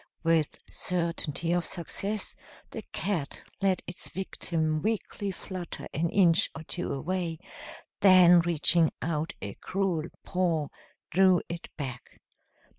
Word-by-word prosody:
With 165 Hz, -2 st, +2 dB
certainty 170 Hz, -2 st, -1 dB
of 175 Hz, 0 st, +2 dB
success, 195 Hz, +5 st, -1 dB, 0.4 s
the -, -, -5 dB
cat 175 Hz, -8 st, -2 dB, 0.2 s
let 190 Hz, -2 st, +2 dB
its 175 Hz, -, -8 dB
victim 160 Hz, -4 st, -2 dB
weakly 210 Hz, -2 st, -2 dB
flutter 185 Hz, -1 st, -6 dB
an 165 Hz, +3 st, 0 dB
inch 175 Hz, -3 st, +4 dB
or 160 Hz, -, -7 dB
two 180 Hz, +2 st, -3 dB
away, 170 Hz, +3 st, -2 dB, 0.6 s
then 185 Hz, -3 st, +8 dB
reaching 170 Hz, -1 st, +3 dB
out 160 Hz, 0 st, -1 dB
a 100 Hz, -1 st, -4 dB
cruel 185 Hz, -5 st, -1 dB, 0.2 s
paw 170 Hz, -5 st, 0 dB, 0.4 s
drew 185 Hz, 0 st, +5 dB
it 170 Hz, 0 st, -6 dB
back. 130 Hz, -5 st, -7 dB
170 Hz, 115 wpm, -29 LUFS, 160-185 Hz, 0.6 s, then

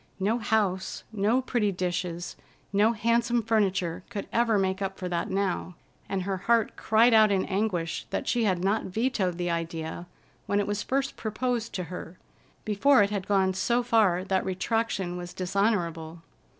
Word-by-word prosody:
No 215 Hz, +5 st, +1 dB
house, 205 Hz, -5 st, 0 dB
no 220 Hz, +5 st, +1 dB
pretty 225 Hz, -5 st, 0 dB
dishes, 175 Hz, -1 st, -3 dB, 0.4 s
no 210 Hz, +3 st, +4 dB
handsome 235 Hz, +1 st, +1 dB
furniture, 195 Hz, -6 st, 0 dB
could 200 Hz, -, -5 dB
ever 230 Hz, -2 st, +3 dB
make 190 Hz, 0 st, 0 dB
up 195 Hz, 0 st, -3 dB
for 185 Hz, -, -4 dB
that 175 Hz, -1 st, -2 dB
now, 190 Hz, -2 st, -1 dB, 0.3 s
and 190 Hz, -2 st, -1 dB
her 195 Hz, 0 st, -2 dB
heart 225 Hz, +3 st, +1 dB
cried 225 Hz, +2 st, +4 dB
out 215 Hz, -1 st, +6 dB
in 190 Hz, -1 st, +1 dB
anguish 190 Hz, -4 st, -2 dB
that -, -, -3 dB
she 240 Hz, -2 st, +1 dB
had 185 Hz, -3 st, +1 dB
not 205 Hz, +3 st, +1 dB
vetoed 195 Hz, -4 st, -1 dB
the 175 Hz, -1 st, -1 dB
idea 165 Hz, 0 st, -4 dB, 0.4 s
when 205 Hz, -, +1 dB
it 205 Hz, -, +1 dB
was 205 Hz, 0 st, -2 dB
first 270 Hz, +3 st, -1 dB
proposed 230 Hz, +1 st, -2 dB
to 185 Hz, -, -2 dB
her, 180 Hz, 0 st, -8 dB, 0.5 s
before 215 Hz, +4 st, +4 dB
it 200 Hz, -, -1 dB
had 200 Hz, -2 st, -3 dB
gone 190 Hz, -2 st, +2 dB
so 240 Hz, +6 st, +1 dB
far 215 Hz, -7 st, +3 dB
that 190 Hz, -1 st, 0 dB
retraction 190 Hz, -1 st, -1 dB
was 175 Hz, 0 st, -7 dB
dishonorable. 175 Hz, -4 st, -1 dB
195 Hz, 165 wpm, -27 LUFS, 180-225 Hz, 0.5 s, out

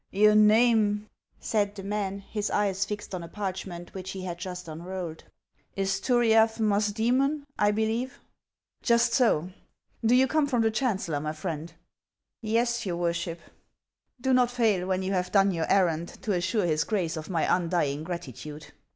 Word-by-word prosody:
" -, -, -56 dB
Your 210 Hz, 0 st, +7 dB
name," 215 Hz, -1 st, +4 dB, 0.3 s
said 205 Hz, -2 st, 0 dB
the 195 Hz, -, -7 dB
man, 200 Hz, -1 st, -2 dB
his 205 Hz, +1 st, -4 dB
eyes 200 Hz, -1 st, +1 dB
fixed 205 Hz, -1 st, -6 dB
on 180 Hz, -, -3 dB
a 170 Hz, -, -7 dB
parch 190 Hz, +1 st, -4 dB
ment 175 Hz, -1 st, -9 dB
which 190 Hz, -1 st, -6 dB
he 190 Hz, -, -6 dB
had 175 Hz, -2 st, -5 dB
just 180 Hz, -1 st, -6 dB
unrolled, 170 Hz, +1 st, -6 dB, 0.3 s
" -, -, -42 dB
is 195 Hz, 0 st, 0 dB
Turiaf 225 Hz, -2 st, +3 dB
Musdoemon, 225 Hz, +7 st, +1 dB, 0.2 s
I 205 Hz, -, +4 dB
believe." 225 Hz, +5 st, -1 dB, 0.3 s
" -, -, -59 dB
Just 235 Hz, 0 st, +4 dB
so. 190 Hz, -, +2 dB, 0.5 s
Do 230 Hz, +2 st, +4 dB
you 260 Hz, +1 st, +5 dB
come 305 Hz, +1 st, +1 dB
from 245 Hz, -5 st, +1 dB
the 225 Hz, -, +2 dB
chancellor, 205 Hz, -, -1 dB
my 155 Hz, +1 st, -3 dB
friend 160 Hz, 0 st, -5 dB, 0.2 s
] -, -, -65 dB
" -, -, -63 dB
" -, -, -64 dB
Yes, 235 Hz, +2 st, 0 dB
your 175 Hz, -3 st, -2 dB
worship." 170 Hz, -1 st, -2 dB, 0.8 s
"Do 260 Hz, +1 st, +1 dB
not 250 Hz, -1 st, +4 dB
fail, 220 Hz, -7 st, +1 dB
when 190 Hz, 0 st, 0 dB
you 190 Hz, +1 st, -1 dB
have 180 Hz, -1 st, -1 dB
done 195 Hz, -1 st, +4 dB
your 165 Hz, -3 st, -2 dB
errand, 170 Hz, -4 st, +2 dB, 0.2 s
to 215 Hz, -, -1 dB
assure 185 Hz, +2 st, 0 dB
his 155 Hz, -2 st, +1 dB
Grace 180 Hz, -7 st, -1 dB
of 155 Hz, -1 st, -7 dB
my 170 Hz, -4 st, 0 dB
undying 165 Hz, -5 st, -1 dB
gratitude." 155 Hz, -3 st, -7 dB
195 Hz, 185 wpm, -27 LUFS, 175-220 Hz, 0.8 s, Your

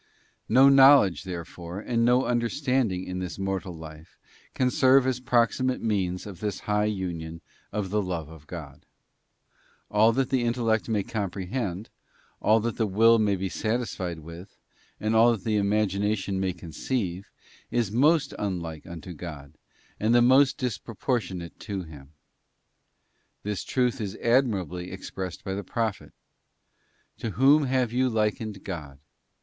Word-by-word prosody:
No 130 Hz, +4 st, +7 dB
knowledge, 135 Hz, -, +6 dB
therefore, 85 Hz, 0 st, -7 dB
and 115 Hz, +2 st, 0 dB
no 125 Hz, +2 st, +4 dB
understanding 120 Hz, -4 st, 0 dB
in 90 Hz, 0 st, -5 dB
this 90 Hz, -1 st, -5 dB
_ -, -, -12 dB
mortal 95 Hz, -2 st, -3 dB
life 80 Hz, +1 st, -12 dB, 0.4 s
can 125 Hz, -1 st, +2 dB
serve 130 Hz, +1 st, +5 dB
as 130 Hz, -2 st, 0 dB
proximate 125 Hz, +1 st, +1 dB
means 95 Hz, -5 st, -1 dB
of 100 Hz, -5 st, -9 dB
this 105 Hz, -2 st, -3 dB
high 105 Hz, 0 st, +1 dB
union 90 Hz, -6 st, -3 dB
_ 85 Hz, -, -13 dB, 0.3 s
of 100 Hz, -3 st, -3 dB
the 105 Hz, 0 st, +1 dB
love 85 Hz, -5 st, -4 dB
of 80 Hz, -1 st, -14 dB
God. 75 Hz, -6 st, -9 dB, 1.0 s
All 110 Hz, +2 st, +5 dB
that 130 Hz, +1 st, 0 dB
the 130 Hz, -2 st, +2 dB
intellect 115 Hz, -2 st, 0 dB
may 105 Hz, -3 st, +1 dB
comprehend; 100 Hz, 0 st, -4 dB, 0.5 s
all 110 Hz, +1 st, +4 dB
that 115 Hz, +1 st, -3 dB
the 110 Hz, -, +1 dB
will 115 Hz, +4 st, +5 dB
may 105 Hz, -2 st, +2 dB
be 95 Hz, +1 st, -2 dB
satisfied 105 Hz, -3 st, -2 dB
with; 85 Hz, +5 st, -11 dB, 0.4 s
and 110 Hz, +1 st, 0 dB
all 115 Hz, +2 st, +6 dB
that 105 Hz, -5 st, -6 dB
the 110 Hz, -2 st, +1 dB
___ -, -, +3 dB
imagination 100 Hz, -1 st, 0 dB
may 95 Hz, -1 st, 0 dB
conceive, 90 Hz, +2 st, -4 dB, 0.4 s
is 115 Hz, -5 st, 0 dB
most 145 Hz, +5 st, +3 dB
unlike 85 Hz, -5 st, -4 dB
unto 85 Hz, 0 st, -8 dB
God, 75 Hz, -4 st, -9 dB, 0.5 s
and 110 Hz, +3 st, +2 dB
j -, -, +7 dB
most 130 Hz, +3 st, +5 dB
disproportionate 110 Hz, -6 st, -3 dB
to 100 Hz, -4 st, -4 dB
Him. 75 Hz, -3 st, -13 dB, 1.3 s
'This 105 Hz, -2 st, -3 dB
truth 125 Hz, -1 st, 0 dB
is 100 Hz, -2 st, -4 dB
admirably 100 Hz, -, 0 dB
ex 95 Hz, -, -8 dB
_ -, -, -38 dB
pressed 95 Hz, -3 st, -5 dB
by 95 Hz, -, -3 dB
the 100 Hz, +1 st, -4 dB
Prophet: 110 Hz, +1 st, -3 dB, 1.1 s
'To 115 Hz, -, -3 dB
whom 140 Hz, +4 st, +6 dB
then 135 Hz, -3 st, -2 dB
have 125 Hz, -3 st, +1 dB
you 130 Hz, +1 st, +2 dB
likened 110 Hz, -1 st, -1 dB
_ 100 Hz, -, -15 dB
God? 75 Hz, -8 st, -7 dB
105 Hz, 155 wpm, -26 LUFS, 90-120 Hz, 1.3 s, No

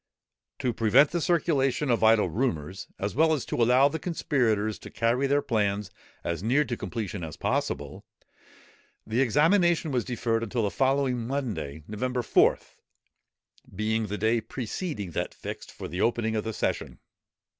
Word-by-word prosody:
To 125 Hz, -2 st, -1 dB
prevent 120 Hz, +7 st, +4 dB
the 170 Hz, -, -1 dB
circulation 150 Hz, -5 st, +1 dB
of 115 Hz, -, +1 dB
idle 110 Hz, -2 st, +5 dB
rumours, 95 Hz, -, -2 dB
as 100 Hz, +1 st, -3 dB
well 160 Hz, +4 st, +4 dB
as 145 Hz, -, -2 dB
to -, -, -3 dB
allow 125 Hz, +4 st, +5 dB
the 160 Hz, +3 st, -3 dB
conspirators 115 Hz, -, 0 dB
to -, -, -10 dB
carry 120 Hz, +4 st, +1 dB
their 145 Hz, +1 st, +2 dB
plans 105 Hz, -3 st, 0 dB, 0.3 s
as 85 Hz, 0 st, -2 dB
near 130 Hz, +8 st, +2 dB
to 120 Hz, -1 st, -3 dB
completion 110 Hz, -6 st, -5 dB
as 80 Hz, -2 st, -7 dB
possible, -, -, -2 dB, 1.0 s
the 115 Hz, +4 st, 0 dB
examination 160 Hz, -, +3 dB
was 125 Hz, -3 st, +1 dB
deferred 115 Hz, -1 st, -1 dB
until 115 Hz, +1 st, -1 dB
the 100 Hz, -, 0 dB
following 130 Hz, -3 st, +1 dB
Monday, 105 Hz, -, -3 dB
November 125 Hz, +4 st, -2 dB
4th, -, -, +2 dB, 1.0 s
being 110 Hz, +2 st, 0 dB
the 105 Hz, +1 st, -3 dB
day 110 Hz, +2 st, +2 dB
preceding 115 Hz, -, -5 dB
that -, -, -3 dB
fixed -, -, -7 dB
for -, -, -7 dB
the 90 Hz, +5 st, -4 dB
opening 115 Hz, -1 st, +1 dB
of 110 Hz, -, -1 dB
the 110 Hz, -, -2 dB
session. -, -, -2 dB
115 Hz, 155 wpm, -27 LUFS, 105-135 Hz, 1.0 s, idle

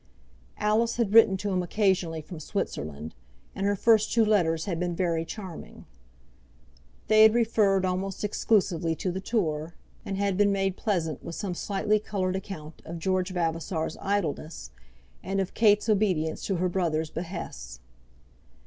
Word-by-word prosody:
Alice 220 Hz, +2 st, +1 dB
had 230 Hz, -4 st, 0 dB
written 220 Hz, -4 st, +7 dB
to 205 Hz, +1 st, -3 dB
him 185 Hz, -1 st, +1 dB
occasionally 180 Hz, -4 st, 0 dB
from 170 Hz, +1 st, -9 dB
Switzerland, 75 Hz, -, -4 dB, 0.4 s
and 195 Hz, -, -1 dB
her 205 Hz, -, +2 dB
first 220 Hz, +1 st, +3 dB
two 230 Hz, -2 st, +4 dB
letters 165 Hz, -7 st, +2 dB
had 175 Hz, -4 st, -2 dB
been 175 Hz, -1 st, -1 dB
very 170 Hz, -2 st, 0 dB
charming. 180 Hz, 0 st, -9 dB, 1.2 s
They 215 Hz, 0 st, +6 dB
had 220 Hz, +1 st, +7 dB
referred 210 Hz, -5 st, +3 dB
almost 185 Hz, +2 st, -2 dB
exclusively 185 Hz, -6 st, +1 dB
to 185 Hz, -, -2 dB
the 190 Hz, +2 st, -4 dB
tour, 165 Hz, -7 st, -2 dB, 0.3 s
and 195 Hz, -, -4 dB
had 200 Hz, -2 st, 0 dB
been 205 Hz, 0 st, +4 dB
made 195 Hz, -1 st, 0 dB
pleasant 170 Hz, -, -2 dB
with 170 Hz, -, -6 dB
some 195 Hz, -3 st, -3 dB
slightly 205 Hz, +3 st, 0 dB
coloured 190 Hz, -3 st, -2 dB
account 165 Hz, -5 st, -7 dB
of 170 Hz, -, -7 dB
George 185 Hz, +2 st, 0 dB
Vavasor's 165 Hz, -2 st, -2 dB
idleness, 160 Hz, -, -2 dB, 0.5 s
and 195 Hz, +1 st, -2 dB
of 190 Hz, -1 st, -2 dB
Kate's 210 Hz, -1 st, +4 dB
obedience 190 Hz, -7 st, +1 dB
to 195 Hz, -, 0 dB
her 180 Hz, +1 st, +1 dB
brother's 165 Hz, -4 st, -1 dB
behests. 160 Hz, -, -6 dB
185 Hz, 150 wpm, -27 LUFS, 165-205 Hz, 1.2 s, written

